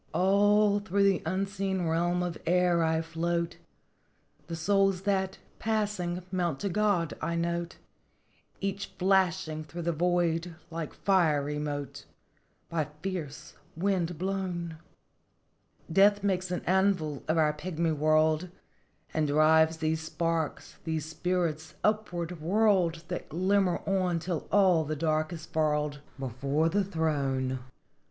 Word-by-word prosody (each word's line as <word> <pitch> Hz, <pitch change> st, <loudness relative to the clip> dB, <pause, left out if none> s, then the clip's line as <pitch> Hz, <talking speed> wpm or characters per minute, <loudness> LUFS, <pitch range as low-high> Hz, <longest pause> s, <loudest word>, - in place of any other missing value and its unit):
" -, -, -33 dB
All 205 Hz, +2 st, +4 dB
through 200 Hz, -1 st, 0 dB
the 195 Hz, -2 st, +3 dB
unseen 190 Hz, 0 st, -1 dB
realm 175 Hz, +2 st, +1 dB
of 175 Hz, -2 st, -3 dB
air 175 Hz, -1 st, +3 dB
I 160 Hz, 0 st, +1 dB
float; 170 Hz, +1 st, -2 dB, 0.9 s
The 165 Hz, -, -4 dB
souls 195 Hz, +2 st, +2 dB
that, 190 Hz, -1 st, 0 dB, 0.2 s
passing, 205 Hz, -5 st, -1 dB
mount 175 Hz, -6 st, -1 dB
to 200 Hz, -, -1 dB
God, 195 Hz, -4 st, +1 dB
I 170 Hz, +1 st, -1 dB
note; 170 Hz, +1 st, -2 dB, 0.8 s
Each 195 Hz, +1 st, -3 dB
flashing 180 Hz, -5 st, +1 dB
through 170 Hz, +3 st, -7 dB
the 170 Hz, -, +1 dB
void 170 Hz, 0 st, 0 dB, 0.2 s
like 165 Hz, -2 st, -5 dB
fiery 150 Hz, -6 st, +2 dB
mote 145 Hz, -1 st, -4 dB, 0.6 s
By 160 Hz, -2 st, -1 dB, 0.2 s
fierce 155 Hz, -6 st, -5 dB, 0.2 s
wind 180 Hz, -2 st, 0 dB
blown. 180 Hz, -3 st, -3 dB, 0.5 s
" 165 Hz, -, -17 dB
Death 205 Hz, 0 st, +5 dB
makes 185 Hz, -2 st, 0 dB
an 180 Hz, -, -3 dB
anvil 185 Hz, -6 st, +1 dB
of 160 Hz, -, +1 dB
our 155 Hz, -1 st, +3 dB
pigmy 165 Hz, +1 st, -2 dB
world, 155 Hz, +3 st, +2 dB, 0.6 s
And 155 Hz, -1 st, +1 dB
drives 160 Hz, +2 st, +4 dB
these 160 Hz, 0 st, -1 dB
sparks 165 Hz, -1 st, -2 dB
these 160 Hz, -2 st, -2 dB
spirits 160 Hz, -1 st, -2 dB
upward 180 Hz, -6 st, -1 dB
whirled 180 Hz, -2 st, +2 dB
That -, -, -5 dB
glimmer 185 Hz, +2 st, +1 dB
on 185 Hz, -3 st, +1 dB
till 165 Hz, -1 st, -3 dB
all 185 Hz, -5 st, +5 dB
the 155 Hz, +1 st, -3 dB
dark 155 Hz, +1 st, 0 dB
is 160 Hz, -2 st, -7 dB
furled, 150 Hz, -2 st, 0 dB, 0.2 s
Before 135 Hz, +5 st, 0 dB
the 205 Hz, +4 st, +1 dB
throne! 140 Hz, -7 st, -1 dB
170 Hz, 130 wpm, -29 LUFS, 160-190 Hz, 0.9 s, Death